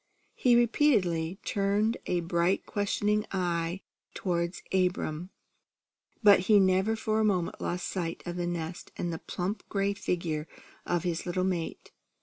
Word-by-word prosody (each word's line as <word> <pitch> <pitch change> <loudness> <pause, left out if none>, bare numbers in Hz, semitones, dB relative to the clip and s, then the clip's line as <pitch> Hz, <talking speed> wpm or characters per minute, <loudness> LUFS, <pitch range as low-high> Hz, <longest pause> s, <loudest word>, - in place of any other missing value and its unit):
He 245 -2 +4
repeatedly 205 - +2
turned 205 +3 +1
a 175 -1 +1
bright 170 +2 +1
questioning 210 +1 0
eye 175 -1 -1 0.3
toward 170 -1 -1 0.2
Abram, 180 -2 0 0.9
but 205 -2 +8
he 210 -2 +8
never 190 +3 +3
for 220 0 0
a - - +3
moment 185 -5 0
lost 180 +1 -2
sight 170 -3 -3
of 175 -1 -4
the 175 -1 -2
nest 170 0 -4
and 175 -1 -2
the 160 - -4
plump 190 +3 -3
gray 200 0 +1
figure 170 -5 -2 0.4
of 175 -1 0
his 175 -1 -2
little 185 +1 0
mate. 180 -3 -3
185 Hz, 140 wpm, -29 LUFS, 170-205 Hz, 0.9 s, but